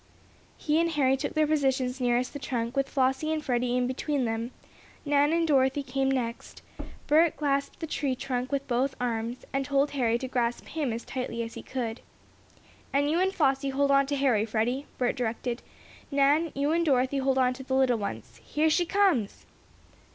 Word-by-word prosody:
He 310 +1 +1
and 335 0 +2
Harry 270 -3 +3
took 285 +4 -4
their 310 0 +4
positions 265 -4 0
nearest 245 0 +1
the 285 - -5
trunk, 240 -2 -3
with 275 0 0
Flossie 265 +3 +1
and 310 -1 -2
Freddie 245 0 +1
between 260 +2 -1
them. 225 +1 -2 0.6
Nan 290 +1 +3
and 335 0 +2
Dorothy 270 -1 +2
came 270 0 -1
next. 240 -3 -3 0.4
Bert 315 +2 +4
clasped 280 -2 -1
the 325 - -3
tree 285 -4 -1
trunk 250 0 -3
with 280 0 -2
both 255 +2 0
arms, 235 0 -3
and 275 0 0
told 280 +1 +1
Harry 235 -4 +1
to 260 - -5
grasp 240 -2 -1
him 295 -6 -2
as 230 +1 -5
tightly 250 -3 -3
as 230 - -7
he - - -7
could. 240 -3 -4 0.9
"And 285 +2 +2
you 335 - +2
and 380 +1 +2
Flossie 275 -5 +1
hold 280 +1 +1
on 275 0 +4
to 285 - -1
Harry, 260 -6 +2
Freddie," 235 +5 -1
Bert 250 -1 0
directed. 240 +1 -3 0.5
"Nan, 285 +3 +3
you 285 +2 +1
and 335 +1 +2
Dorothy 270 -2 +2
hold 265 0 +1
on 255 -1 +3
to 260 - -9
the 265 0 -2
little 255 -3 +3
ones. 200 - -6
Here 310 +1 +1
she 345 +2 +2
comes!" 360 - +1
270 Hz, 190 wpm, -28 LUFS, 245-290 Hz, 0.9 s, their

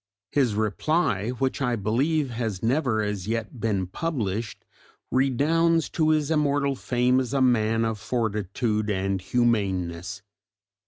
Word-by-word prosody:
His 130 -7 +2
reply, 110 - 0
which 130 +2 -2
I 125 -3 +1
believe 130 +7 0
has 115 -5 -3
never 120 -3 +1
as 105 -2 -3
yet 115 +2 -3
been 105 -4 0
published, 110 - -3 0.5
redounds 155 +5 +2
to 155 -2 +1
his 155 -1 +2
immortal 145 -2 +1
fame 125 0 +1
as 130 +1 -2
a - - +3
man 115 -3 +3
of 110 -2 -2
fortitude 110 -1 -1
and 95 -1 -1
humaneness. 95 -4 -1
115 Hz, 125 wpm, -25 LUFS, 105-135 Hz, 0.5 s, a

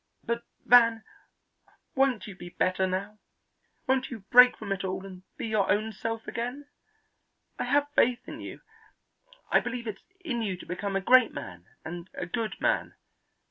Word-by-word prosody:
But, 235 0 -2 0.2
Van, 230 -2 +6 0.9
won't 265 -4 +2
you 200 - -9
be 175 -1 -9
better 185 +1 +1
now? 200 +3 -4 0.7
Won't 260 0 +1
you 230 -5 -7
break 250 0 +8
from 200 - -7
it 195 -1 -1
all 190 0 -3
and 185 -2 -10 0.2
be - - -4
your 215 -4 +1
own 215 +2 +1
self 225 +1 -5
again? 245 +5 -4 0.9
I - - -1
have 290 0 +2
faith 245 0 +2
in - - -7
you. - - -8 0.9
I - - +6
believe 245 -2 -5
it's 210 -3 -6 0.2
in 255 -10 -2
you 195 -5 -2
to - - -11
become 195 +3 -4
a 195 - +1
great 250 +4 +5
man 90 -2 -8 0.2
and 175 +2 -7
a - - -3
good 220 +5 -3
man. - - 0
215 Hz, 170 wpm, -28 LUFS, 190-245 Hz, 0.9 s, break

